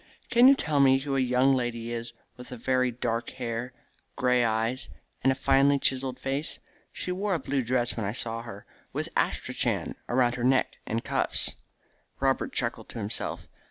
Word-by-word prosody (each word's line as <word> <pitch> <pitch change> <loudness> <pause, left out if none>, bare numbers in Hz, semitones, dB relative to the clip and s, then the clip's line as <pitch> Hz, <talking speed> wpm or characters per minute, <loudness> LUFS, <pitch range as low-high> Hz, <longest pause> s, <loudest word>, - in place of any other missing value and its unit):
Can 240 +1 +7
you 275 - +8
tell 150 - 0
me 135 -1 +6
who 135 0 -3
a - - +2
young 130 +1 +3
lady 120 -2 -2
is 115 0 -5 0.2
with 125 - -11
very 130 +1 0
dark 120 -1 -2
hair, 120 0 -3 0.4
grey 125 -2 +3
eyes, 115 +3 -1 0.3
and 135 - +5
a - - 0
finely 135 +1 +4
chiselled 130 -1 +1
face? 135 +3 -2 0.3
She 180 - -4
wore 195 +1 0
a - - -1
blue 135 0 -1
dress 120 0 0
when 110 - -3
I - - -1
saw 115 0 -3
her, 110 -4 -10 0.3
with - - -3
astrachan - - -1 0.2
about 120 -1 +3
her 120 -1 -4
neck 130 +1 +2
and 115 +1 -2
cuffs." - - +1 0.6
Robert 135 0 +1
chuckled 120 -2 -1
to - - -9
himself. 105 -1 -3
125 Hz, 175 wpm, -27 LUFS, 120-135 Hz, 0.6 s, you